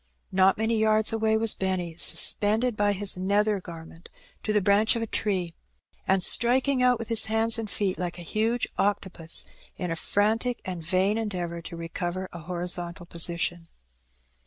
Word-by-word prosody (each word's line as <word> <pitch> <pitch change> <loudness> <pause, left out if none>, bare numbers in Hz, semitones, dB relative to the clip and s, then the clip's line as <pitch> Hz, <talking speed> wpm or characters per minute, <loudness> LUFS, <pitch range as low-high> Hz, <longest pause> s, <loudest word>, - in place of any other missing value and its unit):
Not 190 0 +3
many 220 +1 0
yards 220 0 +2
away 220 0 +1
was 225 -1 +1
Benny 185 -3 -3
sus - - +5
pended 220 +3 0
by 205 0 +1
his 200 0 -1
nether 200 +2 +1
garment 165 -1 -12 0.3
to 215 - -2
the 210 - +3
branch 205 +4 +3
of 230 - -2
a - - -1
tree, 190 -6 -2 0.5
and 190 -1 +2
striking 255 +5 +4
out 250 -1 +3
with 230 0 -8
his 225 -1 +5
hands 225 +1 +1
and 220 -2 -5
feet 190 0 -2
like 175 -1 -4
a 175 - -8
huge 225 +6 -1
octopus 190 -5 +1 0.3
in 180 -2 -4
a - - -1
frantic 220 +7 -1
and 180 -3 -5
vain 190 +6 +1
endeavour 175 -6 -4
to 170 - -9
recover 175 +2 -5
a 170 - -8
hori 175 +1 -5
zontal 175 0 -1
position. 170 0 -2
200 Hz, 175 wpm, -26 LUFS, 175-220 Hz, 0.5 s, sus